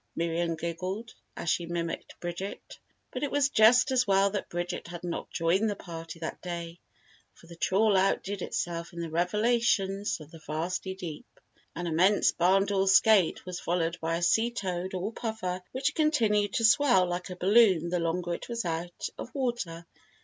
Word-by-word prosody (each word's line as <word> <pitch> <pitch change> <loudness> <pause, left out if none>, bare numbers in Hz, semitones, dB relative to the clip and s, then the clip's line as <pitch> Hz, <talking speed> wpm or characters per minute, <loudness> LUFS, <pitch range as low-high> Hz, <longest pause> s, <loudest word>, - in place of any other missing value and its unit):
'" - - -47
Miriam 170 0 -1
giggled 185 +7 -4 0.2
as - - -6
she 170 +1 0
mimicked 170 -1 -4
Bridget. 175 +3 -6 0.3
But - - -5
it 290 - -1
was 285 0 +2
just 245 +3 +5
as 255 -2 +2
well 195 0 +3
that 205 - -4
Bridget 175 0 -4
had 175 0 -8
not 175 -1 -4
joined 185 +6 +1
the 205 - -2
party 165 -3 -8
that 160 - -5
day 170 -1 -6 0.6
for - - -18
the 170 0 -12
trawl 200 +5 +2
outdid 195 +1 +1
itself 170 0 -3
in 170 - -7
the 165 -1 -4
revelations 200 +2 +1
of 155 0 -13
the 165 - -12
vasty 170 +5 -3
deep. 170 -5 -9 0.4
An 175 - -4
immense 180 +5 +3
barndoor 195 +2 +2
skate 195 -1 +4
was 180 -1 -5
followed 170 0 -1
by 165 +1 0
a 170 - -2
sea 225 +7 +3
toad, 190 -5 -4
or 195 +5 -3
puffer, 220 -6 -3
which 260 +1 -1
continued 220 - +2
to 230 - +2
swell 225 -5 +5
like 175 +1 -4
a 180 - -6
balloon 190 -3 +4
the 180 0 0
longer 170 +1 -1
it - - -7
was 235 -2 -3
out 170 +1 -3
of - - -6
water. 235 -11 -3
180 Hz, 180 wpm, -28 LUFS, 170-210 Hz, 0.6 s, just